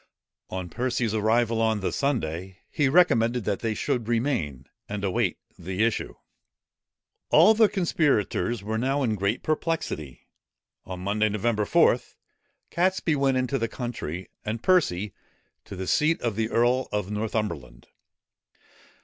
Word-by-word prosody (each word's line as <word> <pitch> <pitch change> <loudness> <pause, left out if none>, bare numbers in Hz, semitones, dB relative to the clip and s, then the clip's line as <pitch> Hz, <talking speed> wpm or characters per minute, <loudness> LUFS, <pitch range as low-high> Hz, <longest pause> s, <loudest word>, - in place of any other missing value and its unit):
On 95 -1 -4
Percy's 120 +1 -1
arrival 115 +1 +2
on 110 -2 +1
the 95 - -1
Sunday, 95 - -2
he 145 -3 +2
recommended 125 -8 +3
that 100 -1 -1
they 115 -2 -2
should 125 -4 -1
remain, 115 - -1 0.2
and 100 0 -4
await 95 -2 0 0.2
the 95 +4 -2
issue. 115 -1 -1 1.1
All 220 - +7
the 220 -1 +4
conspirators 120 - 0
were 110 +2 -2
now 135 +3 0
in 115 -4 +1
great 100 +3 -1
perplexity. 155 - -3 0.6
On 90 -1 -7
Monday, 105 +3 +1
Nov. 105 0 -1
4, - - +5 0.7
Catesby 180 -2 +1
went 135 -2 +2
into 130 +1 0
the 115 - 0
country, 110 - -6
and 110 +2 -4
Percy 105 - +2 0.5
to - - -8
the 95 0 -4
seat 155 - +2
of 115 -4 -1
the 110 +1 -1
earl 120 +3 +2
of 105 -1 -2
Northumberland. 105 - -3
110 Hz, 135 wpm, -26 LUFS, 100-130 Hz, 1.1 s, All